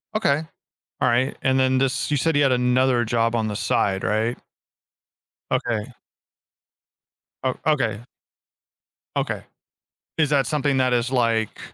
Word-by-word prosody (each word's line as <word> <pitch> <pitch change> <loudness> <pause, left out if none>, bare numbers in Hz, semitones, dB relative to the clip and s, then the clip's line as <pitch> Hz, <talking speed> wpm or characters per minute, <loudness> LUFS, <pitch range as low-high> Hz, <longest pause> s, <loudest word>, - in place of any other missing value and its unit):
Okay, 155 -8 +2 0.6
all - - +3
right, 125 +3 +1
and 130 0 +2
then 130 0 +3
this, 135 +2 0
you - - +3
said 160 +3 +1
you 145 - +4
had 135 - +3
another 125 0 +2
job 115 0 0
on 110 -2 0
the 105 - -3
side, 95 -1 0
right? 110 +3 0 1.1
Okay. 110 -3 0 1.6
Oh, 130 -1 0
okay. 135 -9 +1 1.2
Okay, - - -2 0.8
is 155 -2 +2
that 140 -4 +2
something 145 -1 0
that 130 -1 +2
is 120 0 +1
like, 115 -4 0
125 Hz, 135 wpm, -23 LUFS, 115-135 Hz, 1.6 s, you